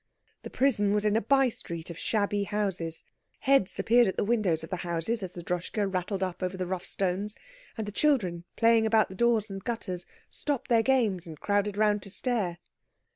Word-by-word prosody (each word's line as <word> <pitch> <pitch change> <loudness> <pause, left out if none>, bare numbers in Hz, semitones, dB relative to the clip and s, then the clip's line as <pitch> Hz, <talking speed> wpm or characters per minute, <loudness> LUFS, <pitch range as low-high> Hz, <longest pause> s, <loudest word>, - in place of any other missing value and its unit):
The - - -8
prison 210 -7 +2
was 210 0 +1
in 210 0 +3
a 225 - +3
by 270 +4 +4
street 170 -6 -6
of 170 - -9
shabby 205 -2 0
houses. 190 -6 -2 0.4
Heads 270 -8 +3
appeared 240 0 +4
at 190 - -2
the - - +2
windows 200 -8 +1
of 160 - -9
the 185 - -1
houses 175 +7 -1
as 185 -2 -5
the 175 - -8
Droschke 180 +4 -3
rattled 190 0 -2
up 185 -1 -4
over 185 0 -2
the 185 - -2
rough 185 +1 -4
stones, 195 +2 -1 0.4
and 220 - -2
the 205 - -5
children 205 - +1
playing 230 -1 +4
about 220 -1 +3
the 190 - -9
doors 225 -1 +2
and 195 -1 -6
gutters 185 -7 -4 0.2
stopped 280 -4 -3
their 230 -2 +5
games 225 -9 +1
and 155 -2 -9
crowded 205 0 0
round 210 -1 +3
to 195 - -9
stare. 205 -5 -1
205 Hz, 200 wpm, -28 LUFS, 180-225 Hz, 0.4 s, their